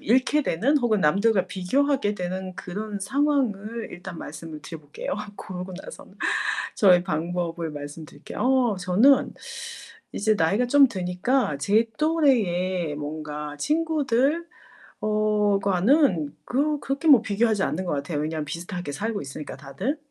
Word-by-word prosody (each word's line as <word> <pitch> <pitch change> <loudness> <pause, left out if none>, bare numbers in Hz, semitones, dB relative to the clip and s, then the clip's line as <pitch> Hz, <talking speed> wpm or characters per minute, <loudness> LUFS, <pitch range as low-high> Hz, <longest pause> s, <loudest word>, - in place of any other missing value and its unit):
잃게 260 +6 +2
되는 270 - +2
혹은 230 -5 +1
남들과 195 +4 +3
비교하게 210 +4 +1
되는 185 0 -4
그런 205 +2 -5
상황을 235 -3 0
일단 180 0 -8
말씀을 160 -2 -8
드려 165 - -8
볼게요. 145 0 -6 0.2
그러고 185 0 -7
나선 - - -12 0.6
저의 180 -4 +5
방법을 170 -1 -2
말씀드릴게요. 145 +2 -9
어 250 -5 +2
저는 215 +10 +4 0.8
이제 215 +1 +2
나이가 205 +7 +2
좀 280 +2 +6
드니까 185 - 0
제 210 +10 +2
또래의 185 - +1
뭔가 150 0 -5
친구들 300 - +1 0.6
어 210 -1 +2
과는 195 - +2
그 290 +3 0
그렇게 275 +4 -2
뭐 275 -7 +8
비교하지 220 -1 +1
않는 190 - -1
것 175 - -2
같아요 145 +2 -2
왜냐면 155 0 -2
비슷하게 170 +1 -5
살고 215 +7 -2
있으니까 140 +2 -7
다들. 190 - -3
200 Hz, 300 characters per minute, -25 LUFS, 170-255 Hz, 0.8 s, 뭐